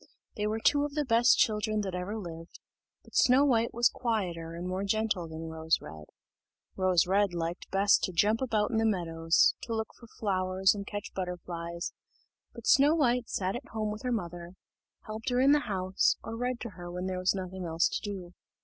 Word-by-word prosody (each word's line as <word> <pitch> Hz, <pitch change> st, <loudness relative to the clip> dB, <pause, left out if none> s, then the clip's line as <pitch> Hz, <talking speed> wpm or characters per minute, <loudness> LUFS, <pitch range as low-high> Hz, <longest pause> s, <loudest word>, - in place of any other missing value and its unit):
They 210 Hz, 0 st, -1 dB
were 215 Hz, +1 st, -1 dB
two 285 Hz, +5 st, +3 dB
of 290 Hz, 0 st, -4 dB
the 300 Hz, -1 st, 0 dB
best 240 Hz, +1 st, +5 dB
children 215 Hz, 0 st, +1 dB
that 190 Hz, -3 st, -4 dB
ever 180 Hz, +4 st, -3 dB
lived; 165 Hz, -4 st, -9 dB, 0.4 s
but -, -, -19 dB
Snow 260 Hz, +2 st, +5 dB
white 235 Hz, -4 st, +2 dB
was 240 Hz, +1 st, +4 dB
quieter 175 Hz, -9 st, -3 dB
and 175 Hz, +2 st, -5 dB
more 185 Hz, +1 st, -2 dB
gentle 205 Hz, -4 st, 0 dB
than 160 Hz, 0 st, -7 dB
Rose 160 Hz, 0 st, +1 dB
red. 75 Hz, 0 st, -10 dB, 0.7 s
Rose 185 Hz, -3 st, +3 dB
red 195 Hz, 0 st, +2 dB
liked 170 Hz, +1 st, -4 dB
best 200 Hz, +1 st, +4 dB
to 185 Hz, -, -5 dB
jump 210 Hz, +7 st, +2 dB
about 220 Hz, -4 st, 0 dB
in 225 Hz, -, 0 dB
the 225 Hz, -, +2 dB
meadows, 165 Hz, -5 st, +2 dB
to 230 Hz, -, -4 dB
look 220 Hz, -1 st, -3 dB
for 235 Hz, -, -16 dB
flowers 190 Hz, -3 st, +1 dB
and 200 Hz, -1 st, -6 dB
catch 205 Hz, -1 st, -6 dB
butterflies; 170 Hz, -2 st, -5 dB, 0.6 s
but 235 Hz, -2 st, -11 dB
Snow 285 Hz, +3 st, +5 dB
white 250 Hz, -6 st, +1 dB
sat 190 Hz, +2 st, -1 dB
at 245 Hz, -, -7 dB
home 215 Hz, -1 st, -1 dB
with 215 Hz, -, -6 dB
her 250 Hz, -, -2 dB
mother, 175 Hz, -5 st, -4 dB, 0.5 s
helped 220 Hz, +5 st, -4 dB
her 245 Hz, 0 st, +1 dB
in 270 Hz, +2 st, +5 dB
the 295 Hz, 0 st, +3 dB
house, 185 Hz, -1 st, +1 dB
or 225 Hz, -, -5 dB
read 245 Hz, +1 st, -2 dB
to 235 Hz, -, -4 dB
her 175 Hz, -1 st, -9 dB
when 180 Hz, +1 st, -4 dB
there 185 Hz, -1 st, -2 dB
was 185 Hz, +2 st, +2 dB
nothing 185 Hz, -1 st, -5 dB
else 165 Hz, +1 st, +2 dB
to -, -, -3 dB
do. 190 Hz, -4 st, -6 dB
200 Hz, 205 wpm, -29 LUFS, 175-225 Hz, 0.7 s, best